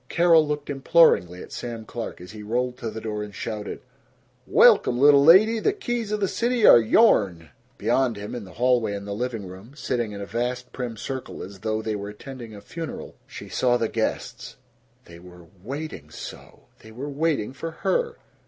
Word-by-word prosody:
Carol 170 Hz, -3 st, +4 dB
looked 145 Hz, -1 st, -3 dB
imploringly 135 Hz, -, +3 dB
at -, -, -14 dB
Sam 115 Hz, -2 st, -6 dB
Clark 115 Hz, 0 st, -6 dB
as 90 Hz, -, -10 dB
he 105 Hz, 0 st, -10 dB
rolled 125 Hz, +4 st, -2 dB
to 115 Hz, -, -4 dB
the 110 Hz, +1 st, -6 dB
door 105 Hz, -1 st, -4 dB
and 105 Hz, -1 st, -8 dB
shouted, 105 Hz, -2 st, -5 dB, 0.7 s
"Welcome, 120 Hz, -, +5 dB
little 140 Hz, +1 st, +6 dB
lady! 210 Hz, +8 st, +6 dB
The 390 Hz, -, +1 dB
keys 240 Hz, -, -3 dB
of 210 Hz, -, -1 dB
the 195 Hz, -, +1 dB
city 235 Hz, +2 st, +1 dB
are -, -, +9 dB
yourn!" 100 Hz, -, +3 dB, 0.3 s
Beyond 130 Hz, -4 st, +1 dB
him, 105 Hz, +1 st, -7 dB
in 120 Hz, -3 st, -5 dB
the 95 Hz, -2 st, -13 dB
hallway 120 Hz, -2 st, +1 dB
and 100 Hz, 0 st, -7 dB
the 100 Hz, -, -4 dB
living 115 Hz, -1 st, -4 dB
room, 95 Hz, +7 st, -12 dB
sitting 120 Hz, -6 st, -2 dB
in 100 Hz, -, -7 dB
a 100 Hz, -, -5 dB
vast 125 Hz, +3 st, -3 dB
prim 120 Hz, -3 st, -5 dB
circle 130 Hz, +4 st, -6 dB
as 95 Hz, +1 st, -10 dB
though 110 Hz, +2 st, -2 dB
they 110 Hz, -1 st, -2 dB
were 100 Hz, 0 st, -5 dB
attending 115 Hz, +1 st, -10 dB
a 100 Hz, -, -11 dB
funeral, 165 Hz, +6 st, -7 dB
she -, -, -10 dB
saw 125 Hz, -1 st, +1 dB
the 115 Hz, -, 0 dB
guests. 110 Hz, -1 st, -3 dB, 0.5 s
They 85 Hz, 0 st, -13 dB
were 90 Hz, -1 st, -14 dB, 0.2 s
WAITING 135 Hz, -, -6 dB
so! -, -, -10 dB, 0.2 s
They 110 Hz, -, -14 dB
were 130 Hz, +6 st, -6 dB
waiting 145 Hz, -5 st, -1 dB
for 165 Hz, +4 st, -5 dB
her! 470 Hz, -, -1 dB
120 Hz, 190 wpm, -24 LUFS, 105-145 Hz, 0.7 s, are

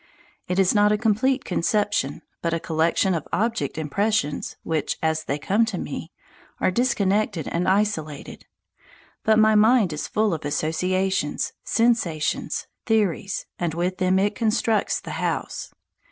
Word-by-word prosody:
It 180 Hz, -, -1 dB
is 190 Hz, -1 st, +4 dB
not 210 Hz, -1 st, +4 dB
a 210 Hz, -, +3 dB
complete 240 Hz, +5 st, +1 dB
conception, 200 Hz, -5 st, 0 dB, 0.2 s
but 170 Hz, 0 st, 0 dB
a -, -, -1 dB
collection 165 Hz, +4 st, +1 dB
of 165 Hz, -4 st, -3 dB
object 225 Hz, -4 st, -1 dB
impressions 160 Hz, 0 st, -1 dB
which, 160 Hz, -2 st, -1 dB
as 160 Hz, 0 st, 0 dB
they 140 Hz, -, -1 dB
come 200 Hz, +9 st, +2 dB
to 220 Hz, -5 st, -4 dB
me, 160 Hz, +2 st, -5 dB, 0.5 s
are -, -, +2 dB
disconnected 205 Hz, -, +1 dB
and 175 Hz, +1 st, -1 dB
isolated. 185 Hz, -7 st, -1 dB, 0.8 s
But 220 Hz, 0 st, +4 dB
my 220 Hz, 0 st, +5 dB
mind 215 Hz, -4 st, +4 dB
is 150 Hz, -, -4 dB
full 215 Hz, -3 st, +1 dB
of 160 Hz, -, -4 dB
associations, 165 Hz, +3 st, -1 dB
sensations, 225 Hz, -10 st, 0 dB, 0.2 s
theories, 205 Hz, -3 st, 0 dB
and 170 Hz, -2 st, -1 dB
with 180 Hz, +2 st, -1 dB
them 185 Hz, 0 st, +3 dB
it 205 Hz, +2 st, +2 dB
constructs 220 Hz, -1 st, +1 dB
the -, -, -8 dB
house. -, -, -3 dB
190 Hz, 140 wpm, -24 LUFS, 160-215 Hz, 0.8 s, my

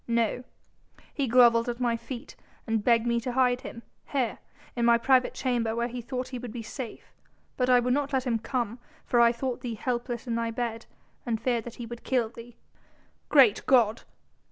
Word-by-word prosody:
"No! 235 Hz, +1 st, 0 dB, 0.7 s
He 280 Hz, -2 st, -1 dB
grovelled 235 Hz, -1 st, +5 dB
at 240 Hz, 0 st, -4 dB
my 240 Hz, -2 st, +1 dB
feet 245 Hz, +3 st, -8 dB, 0.3 s
and 225 Hz, -2 st, -1 dB
begged 235 Hz, 0 st, +3 dB
me 235 Hz, 0 st, +1 dB
to 245 Hz, +1 st, -4 dB
hide 250 Hz, -1 st, +2 dB
him... 235 Hz, -, -9 dB, 0.2 s
here... 260 Hz, -5 st, -1 dB, 0.4 s
in 240 Hz, -, -1 dB
my 235 Hz, 0 st, +5 dB
private 255 Hz, +2 st, +3 dB
chamber 235 Hz, -4 st, -1 dB
where 235 Hz, +1 st, 0 dB
he 245 Hz, 0 st, -5 dB
thought 250 Hz, +1 st, -4 dB
he 255 Hz, -1 st, -5 dB
would 245 Hz, -2 st, -7 dB
be 235 Hz, 0 st, -6 dB
safe... 240 Hz, +1 st, -8 dB, 0.4 s
but 250 Hz, -1 st, 0 dB
I 250 Hz, -1 st, +6 dB
would 250 Hz, +1 st, +1 dB
not 285 Hz, 0 st, 0 dB
let 265 Hz, -1 st, 0 dB
him 235 Hz, -3 st, 0 dB
come 240 Hz, -1 st, -3 dB, 0.3 s
for 240 Hz, -, +3 dB
I 235 Hz, 0 st, +6 dB
thought 245 Hz, +1 st, -4 dB
thee 235 Hz, -2 st, -4 dB
helpless 240 Hz, +1 st, -3 dB
in 235 Hz, -, -2 dB
thy 230 Hz, 0 st, -1 dB
bed, 230 Hz, -1 st, -4 dB, 0.4 s
and 230 Hz, -3 st, -2 dB
feared 235 Hz, -1 st, -1 dB
that 240 Hz, -, -8 dB
he 240 Hz, -, -7 dB
would 235 Hz, +1 st, -9 dB
kill 245 Hz, -4 st, +1 dB
thee." 235 Hz, 0 st, -13 dB, 0.7 s
"Great 260 Hz, -8 st, +5 dB
God!" 235 Hz, -4 st, +4 dB
240 Hz, 200 wpm, -27 LUFS, 230-250 Hz, 0.7 s, I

